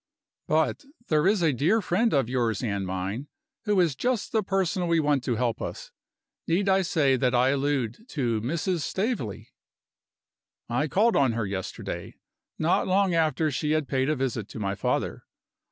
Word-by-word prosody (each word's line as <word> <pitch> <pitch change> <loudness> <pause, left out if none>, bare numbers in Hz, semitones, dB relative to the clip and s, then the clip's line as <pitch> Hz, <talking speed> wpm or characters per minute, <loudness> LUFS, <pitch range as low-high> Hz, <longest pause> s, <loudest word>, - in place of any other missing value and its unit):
But 155 - +1 0.3
there 155 +2 +3
is 200 -3 +3
a 155 -3 +3
dear 165 - +2
friend 215 +4 +1
of 135 -5 +2
yours 120 -3 0
and 100 -4 -2
mine, 95 +9 -3 0.4
who 205 -2 +2
is 165 -6 +2
just 245 - -1
the 220 - +2
person 190 -2 0
we 170 -1 +3
want 145 -4 +1
to 120 - 0
help 115 -1 -1
us. - - -6 0.6
Need 185 +4 +1
I 190 0 +4
say 150 -7 +2
that 125 0 +1
I 125 +2 +4
allude 140 - -1
to 120 -7 -1
Mrs. 170 - -1
Staveley? 190 - -3 1.2
I 125 +6 0
called 220 +9 +3
on 130 -4 +3
her 115 -2 -1
yesterday, 95 -1 -5 0.4
not 160 +3 +1
long 190 -1 +2
after 155 -2 +1
she 150 +3 0
had 155 -3 0
paid 135 0 0
a 155 - +2
visit 125 -6 -2
to - - -8
my 100 -2 -1
father. - - -2
145 Hz, 170 wpm, -26 LUFS, 120-180 Hz, 1.2 s, I